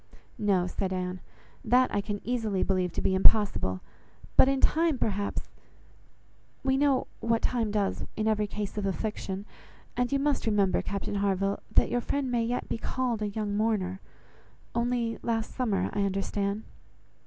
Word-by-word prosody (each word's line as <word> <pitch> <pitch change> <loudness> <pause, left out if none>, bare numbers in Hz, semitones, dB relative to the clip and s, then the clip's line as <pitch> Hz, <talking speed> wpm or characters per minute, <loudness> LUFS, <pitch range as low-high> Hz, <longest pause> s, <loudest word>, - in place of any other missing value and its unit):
"No," 195 -4 +2
said 185 +1 -2
Anne, 185 0 -2 0.4
"that 250 +3 +4
I 205 - +2
can 205 0 -4
easily 225 -6 0
believe 185 -2 +1
to - - -2
be 190 - +2
impossible; 190 - +3 0.5
but - - +7
in 275 -1 +1
time, 320 -1 +3
perhaps—we 215 +5 -5
know 275 -1 +3
what 230 0 +1
time 230 -3 +1
does 205 -2 0
in 215 0 -1
every 215 -1 +2
case 210 0 -4
of 200 - -1
affliction, 195 -1 -3 0.5
and 245 +1 0
you 280 - +3
must 280 -3 0
remember, 205 -3 +3
Captain 200 0 -4
Harville, 195 0 +1 0.2
that - - +5
your 245 - +1
friend 270 +1 -1
may 235 -1 +2
yet 240 +2 -2
be - - -3
called 245 -3 -1
a 210 - 0
young 205 0 -2
mourner—only 225 +3 -3
last 225 -2 -1
summer, 210 -8 0
I 205 - 0
understand." 200 +1 -1
210 Hz, 155 wpm, -29 LUFS, 195-240 Hz, 0.5 s, but